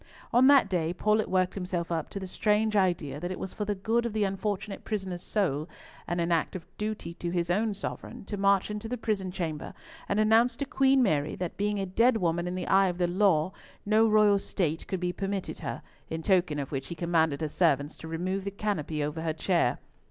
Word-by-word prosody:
On 250 +2 +6
that 275 -6 +6
day, 175 -3 -1
Paulett 215 +3 +2
worked 185 -1 +1
himself 180 -3 -3
up 160 -2 -2
to 200 - -5
the 190 - -5
strange 210 +3 +1
idea 170 -8 +1
that 175 - -4
it 185 - -4
was 190 - -5
for 210 - -3
the 205 0 -1
good 225 +5 0
of 225 - -6
the 215 -1 +1
unfortunate 200 +1 -3
prisoner's 190 -5 -3
soul, 170 -8 -1 0.4
and 175 - -1
an 170 0 0
act 165 +1 +1
of 175 - -6
duty 210 -5 -4
to 175 0 -4
his 175 0 -1
own 210 +2 +1
sovereign, 200 - -6
to 205 - -4
march 200 0 +2
into 210 +1 -5
the 250 - -2
prison 205 -5 -2
chamber 160 -4 -4 0.3
and 200 - +1
announce 225 +3 +4
to 280 - -3
Queen 270 0 +3
Mary 150 -8 +1
that 180 -2 -4
being 205 0 -1
a 195 - -1
dead 230 +6 +3
woman 175 -2 0
in 180 - -3
the 185 - -3
eye 195 0 +5
of 175 -1 -2
the 180 - +2
law, 180 -2 +2 0.3
no 215 +2 +4
royal 210 -2 +5
state 165 -5 -2
could 190 - -2
be 180 0 -1
permitted 195 +1 -3
her, - - -5 0.3
in 160 0 -4
token 180 -5 +2
of 140 -2 -4
which 135 -2 -3
he 170 - -6
commanded 165 -3 +1
her 155 - 0
servants 150 -2 +1
to 160 - -10
remove 185 +4 -2
the 200 - -2
canopy 175 -7 -2
over 150 +2 -3
her 160 -1 -1
chair. 170 -6 +1
185 Hz, 225 wpm, -28 LUFS, 170-210 Hz, 0.4 s, On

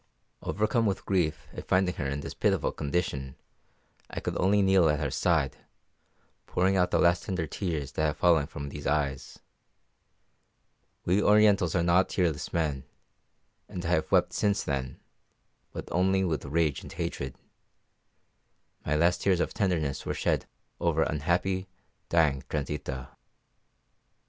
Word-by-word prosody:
Overcome 110 +2 +1
with 100 - -2
grief 90 -6 0
at - - -8
finding 95 -1 +2
her 75 - -2
in 70 +1 -3
this - - -6
pitiful - - +1
condition, 70 -4 -2 0.7
I - - -5
could - - -4
only 100 +2 +3
kneel 95 -4 +4
at 75 0 +1
her 75 -3 -2
side, 75 -8 +1 0.9
pouring 95 +2 +1
out 90 -1 +3
the - - +2
last 85 0 +3
tender 90 -5 -2
tears 80 -3 -3
that - - -3
have 75 -1 0
fallen 80 -5 +3
from 70 -2 -7
these 75 +1 -6
eyes. 70 -3 -1 1.7
We 95 +4 +3
Orientals 105 -6 +4
are 85 - +2
not 85 +2 +3
tearless 85 -5 -1
men, 75 -5 -1 0.9
and 90 -1 -6
I - - -1
have 85 -3 +1
wept - - +3
since 100 -1 +1
then, 65 -3 -3 0.7
but - - -7
only 95 +2 +2
with 80 -7 -1
rage 75 0 0
and - - -10
hatred. 65 - -4 1.5
My 75 - 0
last 85 +3 +2
tears 95 -3 +2
of - - -1
tenderness 85 - -1
were - - -3
shed - - 0 0.3
over 80 -2 +2
unhappy, 90 +5 0 0.4
dying 75 -5 +3
Transita. 70 -3 -4
85 Hz, 145 wpm, -28 LUFS, 75-95 Hz, 1.7 s, kneel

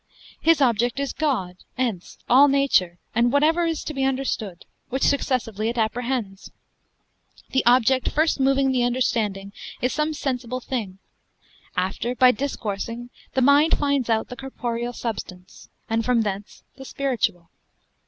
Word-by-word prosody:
His 330 -2 +4
object 240 0 +2
is 280 -1 -2
God, 195 - -1 0.2
ens, 230 -9 -3
all 270 +4 +7
nature, 275 -11 +2 0.2
and 235 +2 +3
whatsoever 315 +5 +3
is 330 -2 -2
to 310 - -5
be 270 -1 -1
understood: 255 -9 -2 0.2
which 265 +2 -2
successively 230 -6 0
it 240 - -4
apprehends. 225 -3 -2 1.0
The 265 - +2
object 255 +1 +4
first 315 0 +1
moving 270 0 +3
the 255 -1 +1
understanding, 225 -5 0 0.3
is 250 - 0
some 305 +1 -1
sensible 255 -3 -3
thing; 225 -8 -4 0.8
after 195 +7 -1
by 255 0 +6
discoursing, 235 -2 -4 0.2
the 260 - +3
mind 285 +4 +5
finds 280 -4 0
out 220 -1 +1
the 250 - -7
corporeal 245 -3 -4
substance, 185 -6 -7 0.2
and 225 0 0
from 245 0 +2
thence 205 -1 -5
the 270 - -10
spiritual. 230 -12 -2
250 Hz, 140 wpm, -23 LUFS, 220-270 Hz, 1.0 s, all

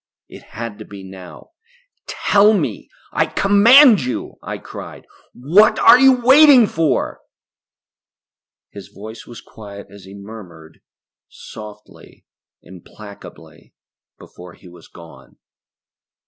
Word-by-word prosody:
It - - -15 0.2
had 115 -2 -8
to - - -11
be 100 -1 -13
now! 95 - -15 0.6
"Tell 205 +1 +1
me. - - -5 0.2
I - - -1
command 225 - +4
you," 125 -1 -7
I - - -8
cried. - - -13 0.3
"What 165 - +2
are 250 - +5
you 260 -3 +2
waiting 270 -2 +5
for?" 160 -8 -3 1.5
His 100 -3 -13
voice 110 +2 -13
was 120 - -13
quiet 100 -2 -14
as 100 -2 -16
he 95 +1 -14
murmured, 95 -6 -14 0.5
softly, 105 -1 -15 0.4
implacably, 100 +3 -16 0.4
before 90 0 -16
he - - -20
was 85 -1 -18
gone. 85 -1 -18
110 Hz, 110 wpm, -17 LUFS, -, 1.5 s, are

